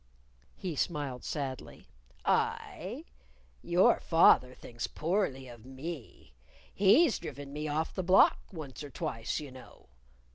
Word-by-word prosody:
He 180 -4 -5
smiled 145 -5 -2
sadly. 135 -4 -5 0.4
"I? - - -1 0.6
Your 175 +2 +4
father 130 -6 +4
thinks 120 -1 -6
poorly 155 -6 -1
of 120 -2 -12
me. 130 - -9 0.4
He's 220 - +5
driven 140 0 -8
me 150 +1 -4
off 155 +2 -2
the 185 - -2
block 185 +2 +5
once 155 -6 -8
or 145 - -7
twice, 115 -1 -3
you 145 -3 -8
know. 130 0 -15
145 Hz, 120 wpm, -31 LUFS, 130-170 Hz, 0.6 s, He's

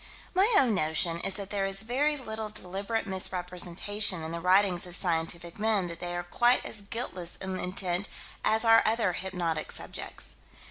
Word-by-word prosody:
My 390 +5 +3
own 250 -5 +4
notion 165 0 +2
is 195 - 0
that 200 -2 -5
there 195 -1 0
is 195 +1 +1
very 285 +6 +1
little 220 -4 -5
deliberate 205 +2 -3
misrepresentation 185 0 0
in 160 - -5
the 170 - -4
writings 185 0 +3
of 175 - -2
scientific 170 0 0
men: 215 -3 +2
that 170 0 -6
they 175 0 -4
are 175 - -3
quite 240 +8 +3
as 215 - -5
guiltless 200 -5 -4
in 190 -1 -5
intent 180 +1 -1 0.3
as 220 +1 +2
are 225 0 +7
other 220 -4 +2
hypnotic 175 -5 -2
subjects. - - -3
190 Hz, 170 wpm, -28 LUFS, 175-220 Hz, 0.3 s, are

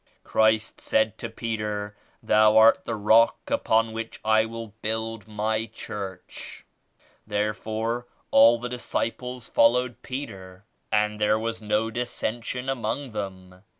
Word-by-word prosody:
Christ 110 0 +1
said 110 -1 +1
to 115 - -5
Peter 105 -2 -4 0.3
*Thou 110 0 +5
art 110 +1 +6
the 115 - -2
rock 110 +2 +3
upon 110 0 +2
which 115 0 -6
I 110 0 +4
will 115 -1 -7
build 110 -1 -3
my 110 +1 -1
church.' 100 -4 -8 0.6
Therefore 110 +3 -2 0.2
all 115 +1 +7
the 120 +1 -5
disciples 125 0 -3
followed 125 +1 +2
Peter 100 -8 -7 0.3
and 105 0 +1
there 105 +1 +3
was 115 0 -3
no 110 +1 0
dissension 120 +1 -3
among 135 +1 -2
them. 95 -3 -7
110 Hz, 120 wpm, -25 LUFS, 105-115 Hz, 0.6 s, all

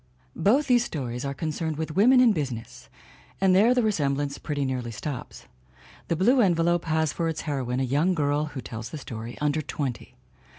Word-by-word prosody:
Both 260 +9 +3
these 245 -3 +4
stories 125 - -4
are 140 - -2
concerned 160 +1 -3
with 160 -1 -4
women 250 +6 +6
in 240 -4 +5
busi 140 -7 -2
ness 115 0 -10 0.5
and 190 -1 +4
there 225 +6 +5
the 250 - +2
resemblance 145 -8 0
pretty 145 -2 -2
nearly 125 -3 -3
stops. 125 +3 -6 0.6
The 170 - 0
Blue 240 +10 +4
Envelope 175 -3 +2
has 160 -2 +1
for 165 - -1
its 160 -1 -3
heroine 130 -4 -2
a - - +1
young 150 +8 +1
girl 145 -1 +1
(who 145 -3 -7
tells 115 0 -7
the 155 - -6
story) 115 -3 -7
under 150 +1 +1
twenty. 140 -4 -5
155 Hz, 185 wpm, -26 LUFS, 135-180 Hz, 0.6 s, women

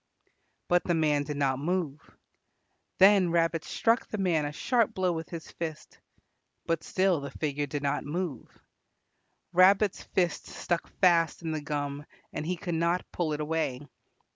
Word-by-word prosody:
But 175 0 +3
the 175 - +1
man 150 -2 +2
did 150 0 -4
not 135 -2 +1
move. 155 -2 -2 0.9
Then 195 -2 +6
Rabbit 165 -1 +1
struck 230 +1 +1
the 215 - -4
man 175 -6 +1
a 145 - -3
sharp 235 - +1
blow 185 -1 +1
with 165 -1 -5
his 165 -2 -8
fist. 160 -2 -7 0.7
But 165 -1 -1
still 185 -5 +1
the 140 - -5
figure 145 -1 -2
did 145 +1 -4
not 140 - 0
move. 155 -4 -4 1.1
Rabbit's 195 +3 +5
fist 175 -3 -1
stuck 175 0 -2
fast 170 -2 +3
in 165 - -2
the 155 -1 -2
gum 145 -1 -4 0.3
and 150 +1 -4
he 180 0 -1
could 175 0 -4
not 170 +2 +1
pull 170 -3 -1
it 150 - -3
away. 150 -4 -1
165 Hz, 160 wpm, -29 LUFS, 150-180 Hz, 1.1 s, Then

